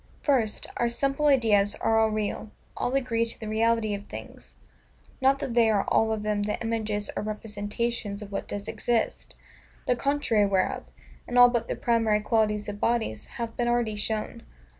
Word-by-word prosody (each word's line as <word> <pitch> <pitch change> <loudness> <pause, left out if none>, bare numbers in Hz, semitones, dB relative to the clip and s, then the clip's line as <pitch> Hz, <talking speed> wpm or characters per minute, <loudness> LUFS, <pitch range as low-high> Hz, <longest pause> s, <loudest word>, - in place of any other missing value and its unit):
First, 240 -7 +1
Our 235 - +1
SIMPLE 275 +5 0
IDEAS 215 -7 +3
are 225 0 +2
all 220 0 +4
real, 215 0 -3 0.3
all 255 - -1
agree 245 -4 +1
to 230 - -3
the 220 - -6
reality 220 0 +1
of 205 0 -6
things: - - -10 0.7
not 270 +1 +4
that 255 - -4
they 230 -2 +4
are 205 -2 +2
all 220 0 +3
of 215 -1 -2
them 210 -1 0
the 210 +1 -2
images 220 -2 -2
or - - -1
representations 210 0 -3
of 205 - -11
what 200 - -4
does 205 0 -5
exist; 235 -2 -1 0.5
the 250 - +2
contrary 245 -5 +1
whereof, 245 +7 0 0.4
in 245 - -2
all 245 0 +9
but 235 -2 -1
the - - -2
primary 225 -3 +2
qualities 210 -1 +1
of 205 0 -5
bodies, 220 - -1
hath 230 -1 -4
been 240 - 0
already 240 -3 +1
shown. 215 +1 -3
225 Hz, 180 wpm, -27 LUFS, 210-240 Hz, 0.7 s, all